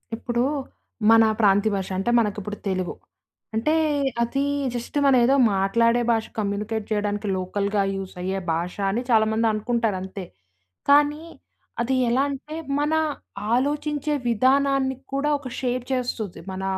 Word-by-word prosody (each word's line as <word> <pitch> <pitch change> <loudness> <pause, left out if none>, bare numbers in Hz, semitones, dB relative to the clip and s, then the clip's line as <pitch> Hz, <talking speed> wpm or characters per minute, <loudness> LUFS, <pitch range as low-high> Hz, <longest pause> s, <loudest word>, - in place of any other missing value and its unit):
ఇప్పుడూ 240 +1 -1 0.7
మన 225 0 +7 0.2
ప్రాంతీయ 205 +1 +4
భాష 190 -1 -3
అంటే, 195 - -1
మనకిప్పుడు 210 -1 -2
తెలుగు. 185 -2 -2 0.6
అంటే, 235 +8 +1 0.5
అదీ 275 +4 0 0.3
జస్ట్ 240 +4 -4
మనం 270 -2 +5
ఏదో 270 +3 +4 0.2
మాట్లాడే 230 +5 +2
భాష 225 -1 +1
కమ్యూనికేట్ 210 +1 -2
చెయ్యడానికి 205 0 -1
లోకల్‌గా 200 +2 -1
యూజయ్యే 190 0 -4
భాష 170 +2 -3 0.2
అని 230 +5 -1
చాలామందనుకుంటారంతే, 220 -3 +1 0.6
కానీ 295 +2 +4 0.6
అది 255 +3 0
ఎలా 255 +3 +2
అంటే, 285 +3 -6 0.2
మన 295 +2 +1 0.6
ఆలోచించే 295 +2 -1 0.2
విధానాన్ని 265 +3 +2 0.2
కూడా 275 +2 0
ఒక 280 - -8
షేర్ 250 -1 -1
చేస్తుంది 240 -6 -3
మన, 190 0 -5
225 Hz, 120 wpm, -24 LUFS, 200-265 Hz, 0.7 s, మన